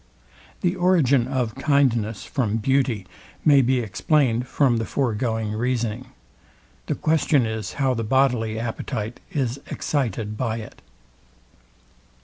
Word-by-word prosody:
The 180 Hz, -1 st, +1 dB
origin 155 Hz, -9 st, +3 dB
of 125 Hz, -4 st, -1 dB
kindness 120 Hz, -8 st, +1 dB
from 115 Hz, -5 st, -1 dB
beauty 125 Hz, -3 st, +1 dB, 0.4 s
may 140 Hz, -2 st, +7 dB
be 130 Hz, 0 st, +2 dB
explained 125 Hz, -, +1 dB
from 130 Hz, -4 st, +2 dB
the 115 Hz, -, -1 dB
foregoing 115 Hz, -4 st, -1 dB
reasoning. 120 Hz, +1 st, -2 dB, 0.8 s
The -, -, 0 dB
question 155 Hz, -4 st, +2 dB
is 110 Hz, -2 st, -4 dB
how 135 Hz, -2 st, +1 dB
the 115 Hz, -2 st, -2 dB
bodily 120 Hz, -2 st, +1 dB
appetite 115 Hz, 0 st, -4 dB
is 135 Hz, -5 st, -1 dB
excited 115 Hz, -7 st, -2 dB
by 115 Hz, -2 st, -1 dB
it. 110 Hz, -, -10 dB
125 Hz, 120 wpm, -23 LUFS, 110-135 Hz, 0.8 s, may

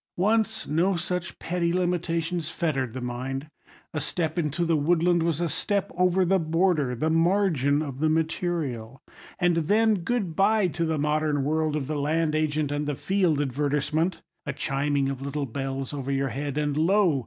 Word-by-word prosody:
Once, 220 Hz, +3 st, +1 dB
no 175 Hz, +6 st, +2 dB
such 175 Hz, +1 st, -3 dB
petty 170 Hz, -1 st, -1 dB
limitations 170 Hz, -2 st, -1 dB
fettered 135 Hz, -9 st, -1 dB
the 130 Hz, -, -5 dB
mind. 135 Hz, +4 st, -4 dB, 0.4 s
A 155 Hz, -, -1 dB
step 160 Hz, +2 st, -1 dB
into 160 Hz, +2 st, 0 dB
the 165 Hz, -1 st, +2 dB
woodland 170 Hz, +3 st, +2 dB
was 165 Hz, -2 st, 0 dB
a 175 Hz, -, +1 dB
step 200 Hz, +4 st, 0 dB
over 180 Hz, +1 st, +3 dB
the 190 Hz, +2 st, +3 dB
border—the 160 Hz, -5 st, +1 dB
margin 165 Hz, -4 st, +2 dB
of 135 Hz, -3 st, -6 dB
the 155 Hz, +1 st, +2 dB
material; 155 Hz, -6 st, -2 dB, 0.3 s
and 175 Hz, -2 st, +2 dB
then, 210 Hz, +6 st, +3 dB
good 200 Hz, -6 st, -1 dB
bye 210 Hz, +1 st, +3 dB
to 170 Hz, 0 st, -2 dB
the 160 Hz, -1 st, 0 dB
modern 150 Hz, -1 st, +1 dB
world 155 Hz, +1 st, 0 dB
of 150 Hz, -3 st, -2 dB
the 150 Hz, +1 st, -3 dB
land 155 Hz, +2 st, +1 dB
agent 155 Hz, -1 st, 0 dB
and 145 Hz, 0 st, -2 dB
the 145 Hz, -, -1 dB
"Field" 180 Hz, -3 st, +1 dB
advertisement! 145 Hz, +5 st, 0 dB, 0.2 s
A 140 Hz, -, -1 dB
chiming 140 Hz, +1 st, 0 dB
of 135 Hz, -1 st, -4 dB
little 140 Hz, +1 st, -3 dB
bells 135 Hz, +2 st, -4 dB
over 140 Hz, -1 st, -3 dB
your 135 Hz, 0 st, 0 dB
head, 140 Hz, +3 st, -4 dB
and 150 Hz, -1 st, 0 dB
lo! 170 Hz, -1 st, +3 dB
155 Hz, 170 wpm, -26 LUFS, 145-175 Hz, 0.4 s, over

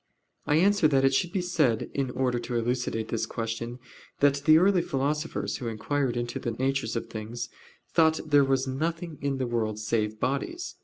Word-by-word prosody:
I 145 Hz, -, +3 dB
answer 195 Hz, +1 st, +4 dB
that, 135 Hz, -2 st, +3 dB
It 135 Hz, -, +3 dB
should 170 Hz, +5 st, +1 dB
be 185 Hz, -1 st, -1 dB
said 155 Hz, -11 st, +1 dB
in 135 Hz, -2 st, -1 dB
order 125 Hz, -1 st, 0 dB
to 120 Hz, 0 st, -5 dB
elucidate 120 Hz, -1 st, -1 dB
this 115 Hz, -, -1 dB
question, 115 Hz, +1 st, -4 dB, 0.4 s
that 140 Hz, -1 st, +5 dB
the 155 Hz, 0 st, +8 dB
early 185 Hz, +1 st, +4 dB
philosophers, 150 Hz, +2 st, -2 dB
who 125 Hz, -, -5 dB
inquired 120 Hz, +3 st, -1 dB
into 120 Hz, 0 st, -3 dB
the -, -, -3 dB
natures 130 Hz, -1 st, -1 dB
of 115 Hz, -, -2 dB
things, 115 Hz, +2 st, -6 dB, 0.4 s
thought 160 Hz, -1 st, +4 dB
there 145 Hz, -2 st, +5 dB
was 135 Hz, -1 st, +1 dB
nothing 160 Hz, +4 st, -3 dB
in 140 Hz, -1 st, -1 dB
the 130 Hz, -, -1 dB
world 115 Hz, -3 st, -1 dB
save 110 Hz, 0 st, -1 dB
bodies. 335 Hz, -, -2 dB
135 Hz, 185 wpm, -27 LUFS, 120-155 Hz, 0.4 s, the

